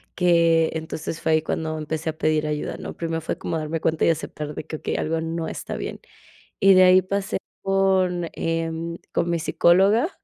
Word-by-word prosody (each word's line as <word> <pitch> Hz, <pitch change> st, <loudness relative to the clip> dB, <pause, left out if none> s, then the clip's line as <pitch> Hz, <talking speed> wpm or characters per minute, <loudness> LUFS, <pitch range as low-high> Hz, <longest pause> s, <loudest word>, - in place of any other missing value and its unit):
que 170 Hz, -2 st, +4 dB
entonces 160 Hz, 0 st, -5 dB
fue 160 Hz, -, +1 dB
ahí 155 Hz, -, +3 dB
cuando 160 Hz, 0 st, -3 dB
empecé 155 Hz, +1 st, -3 dB
a 155 Hz, -, -18 dB
pedir 155 Hz, -1 st, +1 dB
ayuda, 150 Hz, -1 st, -3 dB
¿no?, -, -, -7 dB
primero 165 Hz, -1 st, -2 dB
fue -, -, -3 dB
como 165 Hz, -, -3 dB
a -, -, -2 dB
darme 155 Hz, +1 st, -3 dB
cuenta 160 Hz, -1 st, +1 dB
y -, -, +4 dB
aceptar 150 Hz, -2 st, -3 dB
de -, -, -5 dB
que: 155 Hz, -, -5 dB
"Okey, -, -, -3 dB
algo 160 Hz, +1 st, -1 dB
no 165 Hz, 0 st, -3 dB
está -, -, -6 dB
bien", -, -, -5 dB, 0.6 s
y 195 Hz, 0 st, +6 dB
de 185 Hz, 0 st, +7 dB
ahí 185 Hz, +1 st, +7 dB
pasé 195 Hz, +1 st, -2 dB, 0.2 s
con, 190 Hz, -3 st, +1 dB
em, 165 Hz, 0 st, -3 dB, 0.2 s
con 170 Hz, -, 0 dB
mi 170 Hz, -, 0 dB
psicóloga, 195 Hz, -, +3 dB
165 Hz, 200 wpm, -23 LUFS, 160-180 Hz, 0.6 s, de